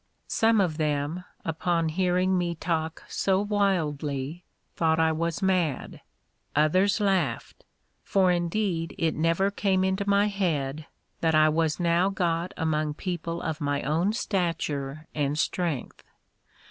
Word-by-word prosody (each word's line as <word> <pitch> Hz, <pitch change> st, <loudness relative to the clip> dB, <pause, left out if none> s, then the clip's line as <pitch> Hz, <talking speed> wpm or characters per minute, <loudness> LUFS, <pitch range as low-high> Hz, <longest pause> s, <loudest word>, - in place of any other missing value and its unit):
Some 225 Hz, -1 st, +3 dB
of 175 Hz, -6 st, +1 dB
them, 150 Hz, +3 st, -1 dB, 0.2 s
upon 165 Hz, 0 st, 0 dB
hearing 185 Hz, +2 st, +1 dB
me 175 Hz, -1 st, 0 dB
talk 160 Hz, -1 st, -2 dB
so 190 Hz, -1 st, +1 dB
wildly, 165 Hz, -7 st, -1 dB, 0.3 s
thought 160 Hz, -1 st, +2 dB
I 160 Hz, 0 st, +4 dB
was 165 Hz, +3 st, -2 dB
mad; 180 Hz, -7 st, 0 dB, 0.5 s
others 185 Hz, +8 st, +3 dB
laughed; 195 Hz, -3 st, -1 dB, 0.4 s
for 190 Hz, -2 st, +3 dB
indeed 175 Hz, -1 st, -1 dB
it 160 Hz, -1 st, +1 dB
never 165 Hz, +5 st, +1 dB
came 195 Hz, -2 st, +1 dB
into 190 Hz, +2 st, 0 dB
my 200 Hz, +1 st, +4 dB
head, 160 Hz, -7 st, -1 dB, 0.3 s
that 160 Hz, -1 st, +2 dB
I 155 Hz, 0 st, +6 dB
was 160 Hz, 0 st, 0 dB
now 175 Hz, +2 st, +3 dB
got 175 Hz, -2 st, -1 dB
among 155 Hz, -2 st, 0 dB
people 170 Hz, -1 st, -4 dB
of 160 Hz, 0 st, -3 dB
my 145 Hz, 0 st, -1 dB
own 165 Hz, +8 st, +1 dB
stature 155 Hz, -, -2 dB
and 145 Hz, -1 st, -1 dB
strength. 165 Hz, -4 st, -2 dB
170 Hz, 130 wpm, -27 LUFS, 155-190 Hz, 0.5 s, I